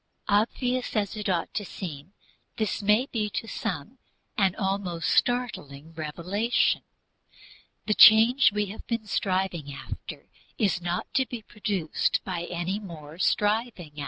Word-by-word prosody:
Obvious 245 Hz, +5 st, +1 dB
as 205 Hz, 0 st, 0 dB
it 210 Hz, -1 st, -3 dB
ought 175 Hz, -3 st, -1 dB
to 210 Hz, -, -2 dB
seem, 170 Hz, -3 st, -8 dB, 0.4 s
this 215 Hz, -1 st, -1 dB
may 210 Hz, +5 st, +3 dB
be 215 Hz, -3 st, -1 dB
to 215 Hz, -, -4 dB
some 220 Hz, -, -4 dB, 0.4 s
an 195 Hz, -3 st, +2 dB
almost 190 Hz, -5 st, -1 dB
startling 165 Hz, -, 0 dB
revelation. 180 Hz, -, 0 dB, 1.0 s
The 215 Hz, -, +2 dB
change 225 Hz, +5 st, +8 dB
we 210 Hz, 0 st, 0 dB
have 205 Hz, +3 st, -9 dB
been 230 Hz, -2 st, -2 dB
striving 185 Hz, -7 st, -1 dB
after 140 Hz, -, -8 dB, 0.3 s
is 195 Hz, -5 st, +1 dB
not 175 Hz, +1 st, -3 dB
to 265 Hz, -1 st, +2 dB
be 235 Hz, -3 st, -7 dB
produced 200 Hz, -7 st, -1 dB
by 175 Hz, -3 st, -3 dB
any 175 Hz, +3 st, -2 dB
more 165 Hz, -5 st, -10 dB
striving. 210 Hz, -5 st, 0 dB
200 Hz, 130 wpm, -27 LUFS, 175-220 Hz, 1.0 s, change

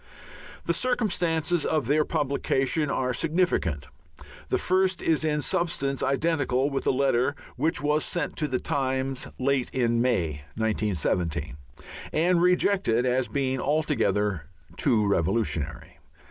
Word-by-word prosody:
The -, -, +1 dB
circumstances 175 Hz, -, 0 dB
of 155 Hz, -5 st, 0 dB
their 150 Hz, +5 st, +3 dB
publication 145 Hz, -1 st, 0 dB
are 130 Hz, -2 st, 0 dB
significant. 155 Hz, -, 0 dB, 0.6 s
The -, -, +2 dB
first 185 Hz, 0 st, +1 dB
is 160 Hz, -1 st, +2 dB
in 150 Hz, -1 st, 0 dB
substance 140 Hz, -5 st, -1 dB
identical 140 Hz, -1 st, +1 dB
with 135 Hz, -, -2 dB
a -, -, +5 dB
letter 135 Hz, 0 st, +1 dB, 0.2 s
which 160 Hz, 0 st, 0 dB
was 150 Hz, +1 st, +2 dB
sent 175 Hz, -, -2 dB
to 150 Hz, -, 0 dB
the 130 Hz, -2 st, -1 dB
Times 130 Hz, -1 st, -1 dB
late 135 Hz, -1 st, 0 dB
in 120 Hz, -2 st, +1 dB
May, 85 Hz, -, 0 dB
1917, 100 Hz, -8 st, -1 dB, 0.6 s
and 170 Hz, +2 st, +2 dB
rejected 180 Hz, -, +2 dB
as 125 Hz, 0 st, +1 dB
being 130 Hz, -2 st, -1 dB
altogether 105 Hz, -, 0 dB, 0.3 s
too 115 Hz, -7 st, +2 dB
revolutionary. 85 Hz, -5 st, -1 dB
135 Hz, 120 wpm, -26 LUFS, 115-160 Hz, 0.6 s, a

